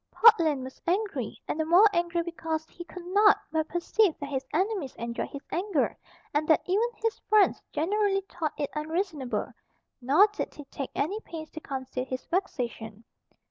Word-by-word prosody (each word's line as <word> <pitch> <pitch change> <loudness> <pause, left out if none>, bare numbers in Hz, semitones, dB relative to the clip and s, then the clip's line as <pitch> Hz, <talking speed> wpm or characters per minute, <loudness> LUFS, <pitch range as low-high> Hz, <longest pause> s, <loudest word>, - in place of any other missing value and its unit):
Portland 330 - +5
was 260 0 -10
angry, 350 - -1
and 310 - -2
the - - +3
more 355 +7 +7
angry 345 0 +1
because 325 -2 -3
he 345 - -10
could 360 -1 -10
not 410 +3 +5
but 315 -1 0
perceive 350 +2 +2
that 285 - -6
his 265 -1 -3
enemies 370 - -1
enjoyed 235 +1 -4
his 280 - -8
anger, 390 +4 0 0.4
and 300 +1 +1
that 315 - +4
even 420 +6 +2
his 450 0 -2
friends 425 -2 +4
generally 390 +4 +1
thought 340 -5 -4
it 285 - -2
unreasonable; 305 - -2 0.5
nor 285 +11 +6
did - - -4
he 290 - -9
take 275 -1 -6
any 385 +9 -1
pains 320 -7 -8
to - - -7
conceal 260 -3 -4
his 255 0 -5
vexation. 235 - -3
320 Hz, 170 wpm, -28 LUFS, 280-385 Hz, 0.5 s, more